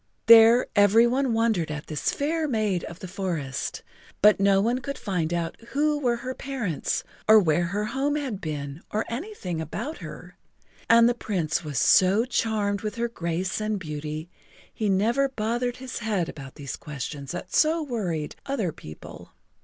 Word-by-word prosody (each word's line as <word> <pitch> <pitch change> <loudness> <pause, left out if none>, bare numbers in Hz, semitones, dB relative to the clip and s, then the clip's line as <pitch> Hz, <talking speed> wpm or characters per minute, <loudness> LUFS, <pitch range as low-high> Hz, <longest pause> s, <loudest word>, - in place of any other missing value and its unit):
There 230 +2 +8
every 205 +3 +6
one 260 +2 +1
wondered 225 -8 +1
at 150 0 -5
this 155 -2 -1
fair 310 +2 -1
maid 215 - 0
of 170 - -8
the 185 - -6
forest, 175 -8 -4 0.4
but 210 -1 +7
no 195 0 +4
one 235 +5 +1
could 280 +2 -5
find 180 -6 -2
out 170 -1 -2
who 295 +2 +1
were 245 -4 +1
her 255 +2 -5
parents 255 - -3 0.2
or 220 0 +8
where 175 -2 +2
her 205 +4 -2
home 270 +6 -1
had 260 -9 -3
been 145 -2 -5
or 215 +1 -1
anything 235 - -4
about 245 - -5
her, - - -10 0.5
and 230 0 +7
the 240 - +3
Prince 180 -11 -2
was 150 -4 -5
so 190 - +5
charmed 215 -5 0
with 215 -2 -4
her 235 0 -1
grace 180 0 -2
and 215 -1 -1
beauty 155 -1 -5 0.5
he 215 -2 -1
never 230 +8 +2
bothered 240 +1 -2
his 260 0 -6
head 210 -7 -1
about 135 -4 -9
these 140 -3 -6
questions 140 -2 -6
that 175 +1 -7
so 320 +1 +3
worried 185 - -3
other 225 -11 -1
people. 75 - -12
210 Hz, 170 wpm, -26 LUFS, 165-240 Hz, 0.5 s, There